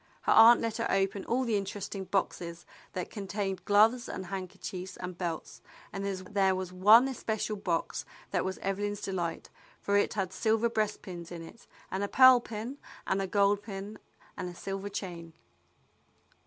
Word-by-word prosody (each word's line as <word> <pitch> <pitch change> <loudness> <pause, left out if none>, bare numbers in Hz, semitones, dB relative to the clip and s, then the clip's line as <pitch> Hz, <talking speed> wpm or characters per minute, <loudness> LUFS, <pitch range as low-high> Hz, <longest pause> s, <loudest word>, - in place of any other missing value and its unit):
Her - - +1
aunt 230 +2 +8
let 225 -1 -2
her 230 - -1
open 195 0 0
all 255 +3 +1
the 230 -4 0
interesting 195 0 -4
boxes 175 -3 -2 0.3
that 180 -1 -4
contained 195 -2 -3
gloves 220 +4 +4
and 190 - -5
handker 185 0 -6
chiefs 185 0 -6
and 180 0 -6
belts, 170 -2 -5 0.3
and 195 - -4
there 190 0 0
was 185 -1 -4
one 215 +7 +7
especial 220 -4 -2
box 180 -5 -2 0.3
that - - +1
was 190 0 -3
Evelyn's 205 +1 -2
delight, 175 -4 -3 0.3
for 200 - 0
it 205 - +1
had 190 -3 -2
silver 225 +1 +2
breast 215 -2 -1
pins 175 -3 -8
in 170 -1 -6
it, 230 +8 -14 0.2
and 190 +2 -1
a - - 0
pearl 255 +2 +8
pin 235 +4 -6 0.3
and 195 +1 0
a 195 - -2
gold 200 +1 +3
pin 205 +1 -7 0.4
and 180 - -4
a 175 - -10
silver 195 +2 -5
chain. 175 -4 -6
195 Hz, 170 wpm, -30 LUFS, 185-215 Hz, 0.4 s, aunt